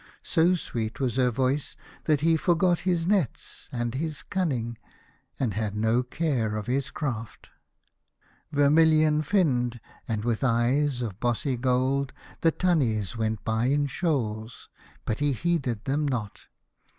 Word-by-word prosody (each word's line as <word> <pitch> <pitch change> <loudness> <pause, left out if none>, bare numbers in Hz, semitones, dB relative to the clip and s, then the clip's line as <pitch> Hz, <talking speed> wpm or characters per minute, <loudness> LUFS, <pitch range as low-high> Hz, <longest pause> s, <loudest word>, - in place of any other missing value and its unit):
So 175 +2 +3
sweet 115 -9 -4
was 130 -2 -1
her 125 -1 +4
voice 130 +4 -1 0.3
that 150 -3 +2
he 165 +1 +4
forgot 175 +1 +2
his 170 -2 +1
nets 185 - -1
and 120 -2 -2
his 155 +2 -3
cunning, 130 - -2 0.6
and 120 -6 0
had 105 0 -2
no 110 +3 +2
care 125 -5 -1
of 105 -1 -3
his 135 +4 -1
craft. 120 -7 -5 1.0
Vermilion 155 +1 +4
finned 130 - +1 0.3
and 110 -2 -2
with 120 +1 0
eyes 125 +2 +2
of 105 -4 -5
bossy 120 +2 0
gold, 130 +2 +1 0.3
the 165 - +3
tunnies 125 - +1
went 110 -2 -2
by 110 +1 +1
in 145 +2 +2
shoals, 125 -8 -2 0.4
but 110 - -2
he 145 -1 +2
heeded 135 -7 -1
them 145 +2 0
not. 115 -7 -4
130 Hz, 140 wpm, -27 LUFS, 115-155 Hz, 1.0 s, her